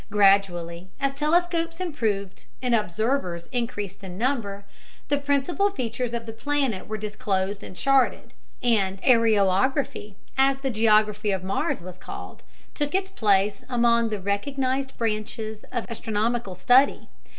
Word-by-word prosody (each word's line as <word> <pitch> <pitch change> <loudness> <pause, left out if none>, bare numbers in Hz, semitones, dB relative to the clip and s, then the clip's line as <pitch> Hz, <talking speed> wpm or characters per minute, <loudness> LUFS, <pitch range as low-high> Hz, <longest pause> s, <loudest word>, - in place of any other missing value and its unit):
Gradually, 190 -4 +2
as 275 -1 0
telescopes 330 +3 +1
improved 220 - -2
and 250 -1 0
observers 210 -3 0
increased 205 -6 -3
in 185 -1 -7
number, 210 -5 -1 0.4
the 285 0 +2
principal 285 +8 +1
features 250 - -3
of 235 -1 -4
the 225 - -7
planet 270 -4 -1
were 215 - -3
disclosed 205 -2 -2
and - - -9
charted, 270 +5 +2 0.3
and 195 -5 +2
"areography," 220 0 +2 0.2
as 270 0 +3
the 270 -1 -1
geography 215 -1 +3
of 190 -2 -1
Mars 190 -2 -1
was 185 +1 -10
called, - - -9 0.3
took 290 +2 -2
its 385 0 0
place 200 - +2
among 235 -2 +3
the 210 -2 -3
recognized 265 +7 -1
branches 215 -1 -3
of 240 -3 -2
astronomical 225 -2 -2
study. 250 +9 +4
225 Hz, 130 wpm, -25 LUFS, 200-270 Hz, 0.4 s, study